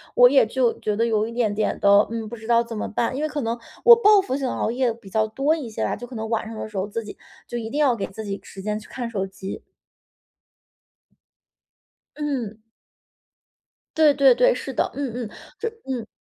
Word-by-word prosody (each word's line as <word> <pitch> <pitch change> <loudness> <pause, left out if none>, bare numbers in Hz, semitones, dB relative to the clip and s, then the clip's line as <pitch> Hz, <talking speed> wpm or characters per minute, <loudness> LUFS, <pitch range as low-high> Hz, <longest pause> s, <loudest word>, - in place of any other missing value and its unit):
我 245 0 +8
也 270 -2 +5
就 240 +1 0
觉 210 - -1
得 230 +2 +1
有 220 -2 +1
一 - - -7
点 230 -3 0
点 215 +1 -1
的， 200 +1 +5
嗯， 225 -1 -4
不 235 - -6
知 220 -1 -11
道 235 0 +4
怎 230 -1 -7
么 - - -3
办。 235 +3 -1
因 280 - -3
为 310 - 0
可 295 -1 -3
能 230 -1 -2 0.3
我 475 - +11
报 425 -3 +6
复 260 -9 -3
性 270 -1 -2
熬 245 - -1
夜 250 0 +1
比 225 -4 -15
较 220 +2 +1
多 275 +8 +1
一 285 -8 -6
些 215 - -4
吧， - - -1
就 245 - -8
可 250 - -10
能 220 0 -4
晚 225 -1 -1
上 225 - -7
的 - - -5
时 210 - -8
候 190 +1 -1
自 230 +2 -4
己 210 - -10 0.3
就 240 - -4
一 225 -2 -4
定 285 - -3
要 275 -5 +4
给 205 - -3
自 220 +3 -8
己 200 -1 -4
时 195 - -10
间 210 +2 -2
去 - - -15
看 240 -2 -5
手 195 -4 -2
机。 195 0 -7 2.6
嗯。 270 -8 -3 1.4
对 310 -2 +6
对 275 -2 +5
对， - - +4
是 - - -6
的。 - - 0
嗯 280 -2 -3
嗯， 240 -3 -5 0.3
这 - - -3 0.2
嗯。 240 -4 -3
230 Hz, 245 characters per minute, -23 LUFS, 215-265 Hz, 2.6 s, 我